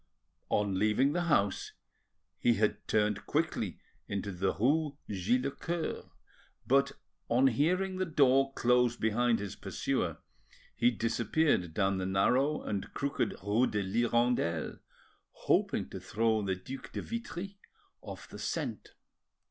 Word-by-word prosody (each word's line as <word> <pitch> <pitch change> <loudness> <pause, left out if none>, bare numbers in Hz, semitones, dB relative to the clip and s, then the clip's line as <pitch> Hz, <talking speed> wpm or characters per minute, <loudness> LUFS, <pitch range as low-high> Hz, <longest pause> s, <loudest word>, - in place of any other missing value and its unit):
On 100 -2 +1
leaving 115 +7 +3
the 175 +1 0
house 100 - +1 0.7
he 120 -1 +3
had 105 -1 0
turned 105 -1 +1
quickly 150 - -1 0.3
into 100 0 -3
the 95 +1 0
rue 145 +5 +1
Git 105 +6 +1
le 140 - -1
Coeur; 170 +2 -4 0.6
but 140 +1 +3 0.4
on 125 +3 +4
hearing 180 +9 +2
the 185 - 0
door 135 -3 +4
close 125 0 +3
behind 115 +2 +2
his 100 -1 -5
pursuer - - -2 0.6
he 120 - +4
disappeared 115 - 0
down 95 -1 +1
the 95 - -2
narrow 125 +10 +2
and 100 -2 -3
crooked 140 +1 -1
rue 105 +5 +2
de 105 -1 -1
l'Hirondelle, 120 -5 0 0.5
hoping - - +1
to - - -6
throw 110 0 +1
the 95 -2 -1
Duc 130 +9 -9
de - - -4
Vitry 200 -4 -6 0.4
off - - -9
the - - -10
scent. - - -4
120 Hz, 130 wpm, -31 LUFS, 100-140 Hz, 0.7 s, on